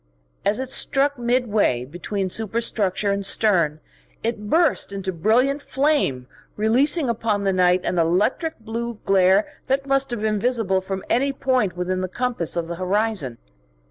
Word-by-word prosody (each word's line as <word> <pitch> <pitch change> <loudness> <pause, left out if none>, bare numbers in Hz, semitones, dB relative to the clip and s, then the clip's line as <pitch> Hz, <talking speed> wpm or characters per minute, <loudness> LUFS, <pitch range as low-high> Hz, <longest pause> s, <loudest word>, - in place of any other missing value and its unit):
As 205 +1 +1
it 260 -1 -4
struck 280 +1 +1
midway 225 - +1
between 185 +6 -4
superstructure 215 -2 0
and 200 0 -1
stern 180 -7 +2 0.4
it 220 -2 -3
burst 330 - +2
into 195 -1 -4
brilliant 245 - +2
flame, 275 - 0 0.3
releasing 260 +8 +2
upon 220 -3 -1
the 195 -1 +1
night 180 0 +3
an 180 - 0
electric 205 - +1
blue 230 +1 -4
glare 195 +1 +4 0.2
that 270 +1 0
must 275 0 +1
have 240 -3 -4
been 215 -1 0
visible 220 -5 0
from 190 0 -5
any 275 +4 +1
point 255 -9 0
within 185 +1 -1
the 185 - -2
compass 240 -6 -2
of 170 -1 -2
the 170 0 -5
horizon. 185 - -1
215 Hz, 150 wpm, -22 LUFS, 185-250 Hz, 0.4 s, glare